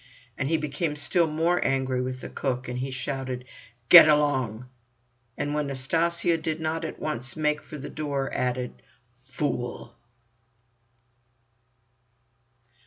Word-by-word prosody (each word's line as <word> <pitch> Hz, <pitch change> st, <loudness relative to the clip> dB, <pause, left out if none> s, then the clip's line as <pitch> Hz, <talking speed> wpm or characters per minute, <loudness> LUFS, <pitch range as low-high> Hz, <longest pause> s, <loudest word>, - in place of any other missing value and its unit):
And 135 Hz, -, -2 dB
he 165 Hz, -, +3 dB
became 150 Hz, +1 st, -2 dB
still 165 Hz, +3 st, +1 dB
more 165 Hz, +3 st, +1 dB
angry 130 Hz, -1 st, 0 dB
with 130 Hz, 0 st, -4 dB
the -, -, -7 dB
cook, 130 Hz, -2 st, -3 dB
and 125 Hz, 0 st, -3 dB
shouted: 130 Hz, -1 st, -4 dB, 0.4 s
"Get 170 Hz, +1 st, +11 dB
along!" 130 Hz, -6 st, +1 dB, 0.7 s
and 145 Hz, -, -2 dB
when 150 Hz, -1 st, -1 dB
Nastasya 165 Hz, +5 st, 0 dB
did 160 Hz, 0 st, -2 dB
not 160 Hz, 0 st, -2 dB
at -, -, -5 dB
once 125 Hz, -4 st, -4 dB
make 150 Hz, -1 st, 0 dB
for 155 Hz, -, -9 dB
the 145 Hz, -, -7 dB
door, 140 Hz, -3 st, -3 dB
added 125 Hz, 0 st, -2 dB, 0.4 s
"Fool!" 125 Hz, -3 st, -4 dB
140 Hz, 120 wpm, -26 LUFS, 130-155 Hz, 0.7 s, Get